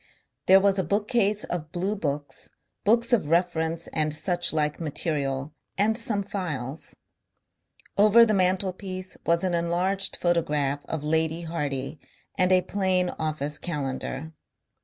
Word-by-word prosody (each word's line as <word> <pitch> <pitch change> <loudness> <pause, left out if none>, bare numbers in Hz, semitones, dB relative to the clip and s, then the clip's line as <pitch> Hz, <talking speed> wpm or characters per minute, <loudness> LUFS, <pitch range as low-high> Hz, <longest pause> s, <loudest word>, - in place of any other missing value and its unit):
There 190 +1 +8
was 195 0 +3
a - - +2
bookcase 210 +3 +1
of 155 -3 -5
bluebooks, 175 -6 -3 0.3
books 235 +3 +3
of 200 -11 +2
reference 165 -1 +1
and 155 -1 +1
suchlike 155 -2 0
material, 145 -3 -2 0.2
and 210 +3 +3
some 220 -3 0
files. 160 -8 -4 1.0
Over 215 +3 +7
the 215 - +1
mantelpiece 185 0 0
was 170 +1 +3
an 185 -2 0
enlarged 175 +3 0
photograph 150 -5 0
of 160 -2 -3
Lady 160 +2 +1
Hardy 145 -3 -3 0.4
and 185 -1 +3
a 185 -1 +5
plain 185 -1 +1
office 150 -2 -2
calendar. 145 -1 -4
170 Hz, 120 wpm, -26 LUFS, 150-195 Hz, 1.0 s, There